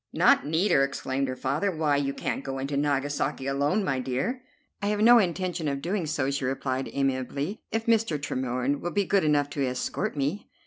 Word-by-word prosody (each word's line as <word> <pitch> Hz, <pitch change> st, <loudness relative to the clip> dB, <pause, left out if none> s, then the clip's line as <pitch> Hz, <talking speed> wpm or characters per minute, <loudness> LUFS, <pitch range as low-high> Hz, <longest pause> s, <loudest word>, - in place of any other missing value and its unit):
"Not -, -, +4 dB
need 170 Hz, +6 st, +1 dB
her?" 135 Hz, -, +5 dB
exclaimed 135 Hz, 0 st, -2 dB
her 130 Hz, -, -3 dB
father. 150 Hz, +9 st, 0 dB
"Why, 155 Hz, -5 st, +1 dB
you 140 Hz, -1 st, 0 dB
can't 140 Hz, -, -3 dB
go 135 Hz, -1 st, -4 dB
into 135 Hz, +2 st, -3 dB
Nagasaki 145 Hz, -1 st, 0 dB
alone, 145 Hz, +9 st, +1 dB
my 135 Hz, -6 st, 0 dB
dear." 135 Hz, -, -2 dB, 0.4 s
"I 200 Hz, -, -1 dB
have 210 Hz, 0 st, 0 dB
no 235 Hz, +2 st, +8 dB
intention 180 Hz, -3 st, -1 dB
of 140 Hz, -1 st, -1 dB
doing 175 Hz, +2 st, -2 dB
so," 145 Hz, -3 st, 0 dB
she 140 Hz, -1 st, -2 dB
replied 130 Hz, 0 st, -2 dB
amiably, 140 Hz, -, -2 dB
"if 225 Hz, 0 st, -1 dB
Mr. 225 Hz, -9 st, +2 dB
Tremorne 130 Hz, 0 st, -1 dB
will 175 Hz, -, -2 dB
be 200 Hz, +2 st, 0 dB
good 195 Hz, +1 st, +2 dB
enough 145 Hz, -2 st, +2 dB
to 140 Hz, -, -1 dB
escort 130 Hz, +3 st, -2 dB
me." 145 Hz, +9 st, -2 dB
145 Hz, 195 wpm, -27 LUFS, 135-180 Hz, 0.4 s, no